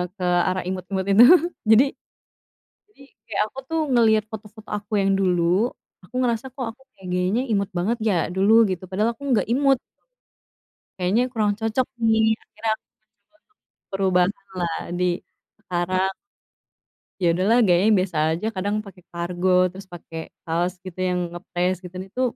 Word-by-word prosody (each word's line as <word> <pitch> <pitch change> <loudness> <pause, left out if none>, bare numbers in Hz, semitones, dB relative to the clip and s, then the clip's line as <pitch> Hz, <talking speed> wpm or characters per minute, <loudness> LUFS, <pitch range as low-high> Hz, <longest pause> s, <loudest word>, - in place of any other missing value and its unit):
ke 185 - -7
arah 180 +1 +1
imut-imut 185 +1 -3
itu. 215 +5 +8 0.4
Jadi, 225 +5 +7 1.0
jadi 415 - -23 0.3
kayak 210 - 0
aku - - -18
tuh 325 - 0
ngelihat 220 -3 +4
foto-foto 215 0 -10
aku 210 +1 -5
yang 195 -1 +2
dulu, 185 +3 +2 0.3
aku 195 +7 -16
ngerasa 245 0 0
kok 255 0 -5
aku 265 - -29 0.2
kayak 190 - -11
gayanya 185 +7 +1
imut 200 0 0
banget 215 +7 0
ya 215 -3 +2 0.2
dulu, 220 +4 +5
gitu. 185 -2 -4
Padahal 215 +5 0
aku 230 - -30
nggak 240 -5 +2
imut. 270 +2 +2 1.2
Kayaknya 190 +7 +2
kurang 215 -4 +1
cocok 225 +3 0 0.2
nih, 220 0 +4 0.2
akhirnya 225 - -4
aku - - -33 0.2
mencoba 220 +8 -38
untuk 425 +6 -44 0.4
perubahanlah 185 -2 0 0.2
di 180 - +1 0.6
sekarang. 185 0 -1 1.1
Iya 175 - +2
udahlah 200 +6 +3
gayanya 185 +5 +4
biasa 185 -3 -2
aja 175 +7 -2
kadang 200 +2 -1
pakai 195 -2 -14
kargo, 175 +2 -2 0.2
terus 195 +1 -11
pakai 165 -1 -8 0.3
kaos 175 +2 0
gitu 185 -1 -9
yang 180 0 0
ngepres, 180 +1 -2
gitu, 180 0 -10
itu, 250 - -4
195 Hz, 150 wpm, -23 LUFS, 180-220 Hz, 1.2 s, itu